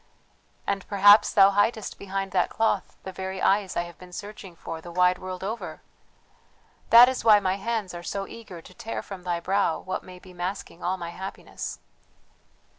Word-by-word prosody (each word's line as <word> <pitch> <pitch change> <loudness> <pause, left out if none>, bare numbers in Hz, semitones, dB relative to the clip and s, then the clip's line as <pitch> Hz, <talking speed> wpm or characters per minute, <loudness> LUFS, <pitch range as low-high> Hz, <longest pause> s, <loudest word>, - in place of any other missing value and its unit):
"And 200 -1 -2
perhaps 205 +1 +6
thou 195 -1 +6
hidest 205 +2 0
behind 195 0 -4
that 180 -1 +2
cloth 220 -3 -1
the 190 - -6
very 190 0 -5
eyes 195 0 +1
I 170 - +1
have 175 -1 -12
been 180 -1 -13
searching 200 -1 -9
for 165 0 -7
the 175 - -10
wide 180 +1 +3
world 185 0 -6
over! 220 +4 -5 1.1
that 235 +2 +10
is 260 0 -2
why 215 -2 +7
my 190 -1 0
hands 210 -2 -3
are 175 - -6
so 195 +3 -4
eager 195 -8 -11
to - - -14
tear 225 - -5
from 195 -2 -9
thy 175 -1 -2
brow 190 -1 +1
what 185 - -4
may 185 0 -12
be 180 0 -15
masking 180 0 -5
all 185 +2 0
my 170 -1 -6
happiness!" 190 +3 -7
190 Hz, 185 wpm, -26 LUFS, 180-205 Hz, 1.1 s, that